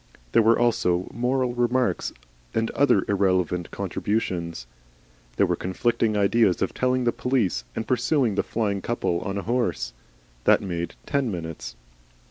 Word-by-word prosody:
There - - +5
were 115 +1 +5
also 95 -7 +1
moral 125 +1 0
remarks 120 -5 +1 0.4
and 115 0 +1
other 140 -8 +3
irrelevant 95 -3 +1
contributions. 85 - -2 0.7
There - - +4
were - - 0
conflicting 110 +3 0
ideas 100 -2 +3
of 95 - -2
telling 125 0 +1
the 120 - +3
police 115 - 0
and 110 - -2
pursuing 125 -1 +2
the - - +1
flying 100 -3 -1
couple 90 -7 -1
on 100 +2 -4
a 100 - -3
horse. 100 - -1 0.5
That - - +6
made 85 -3 -4
ten 140 -4 0
minutes. 80 - -6
105 Hz, 140 wpm, -25 LUFS, 90-120 Hz, 0.7 s, That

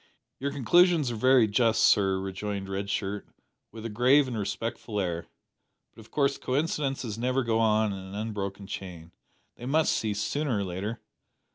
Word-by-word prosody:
"Your 140 - -1
conclusions 155 +2 +4
are - - -3
very 130 0 +5
just, 110 +2 +2
sir," 95 -2 +4
rejoined 95 +1 -4
Red 100 +1 -3
Shirt, 100 0 -3 0.4
with 110 0 -9
a - - -2
grave 130 +6 +4
and 125 - -4
respectful 110 +1 -3
air; 85 -3 -2 0.7
"but - - -17
of 110 - -14
course 140 -1 +1
coincidences 135 -5 -2
never 130 +2 +1
go 115 -1 +1
on 110 -2 +2
in 95 - -6
an 95 +1 -9
unbroken 100 -2 -4
chain. 90 -4 -8 0.5
They 120 - -7
must 155 +3 +2
cease 105 -2 -1
sooner 135 +3 -1
or 100 - -1
later. 95 +5 -4
110 Hz, 165 wpm, -28 LUFS, 100-130 Hz, 0.7 s, very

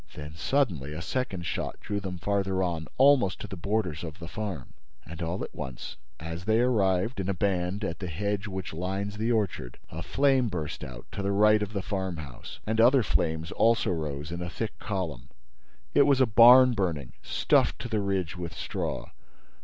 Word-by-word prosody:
Then, 75 0 -7
suddenly, 85 - 0
a 75 - -5
second 95 -5 -2
shot - - -3
drew 100 0 -3
them 95 -2 -5
farther 95 0 0
on, 85 -4 -2
almost 135 -8 +5
to - - -5
the - - -7
borders 95 -4 -1
of 80 -2 -6
the 85 - -8
farm. 90 - -5 0.3
And, 85 +1 -8
all 85 +3 -2
at - - -7
once, 65 -1 -6 0.2
as 80 +2 -6
they 110 +1 +3
arrived, 110 -2 +2
in 95 0 -2
a 100 - 0
band, 95 +1 0
at 85 -5 -3
the 90 - -4
hedge 100 +5 -2
which 95 -4 -5
lines 95 +4 -3
the 110 +3 0
orchard, 95 - -1
a - - -5
flame 135 -3 +2
burst 80 -6 -4
out, 65 -4 -8
to 100 - -4
the 100 0 0
right 105 +1 +5
of 105 -1 -2
the 100 -2 -2
farmhouse, 90 - -5
and 110 +1 +2
other 125 +2 +6
flames 80 -3 0
also 115 -2 +3
rose 75 -2 -3
in 85 0 -4
a 90 - -3
thick 110 +5 -5
column. 80 - -4 0.6
It 140 -1 +5
was 140 -2 +4
a 130 - +6
barn 125 +3 +8
burning, 85 - -2
stuffed - - +2
to - - -4
the 110 -3 0
ridge 95 -3 -1
with 85 -3 -6
straw. - - -4
95 Hz, 190 wpm, -28 LUFS, 85-110 Hz, 0.6 s, barn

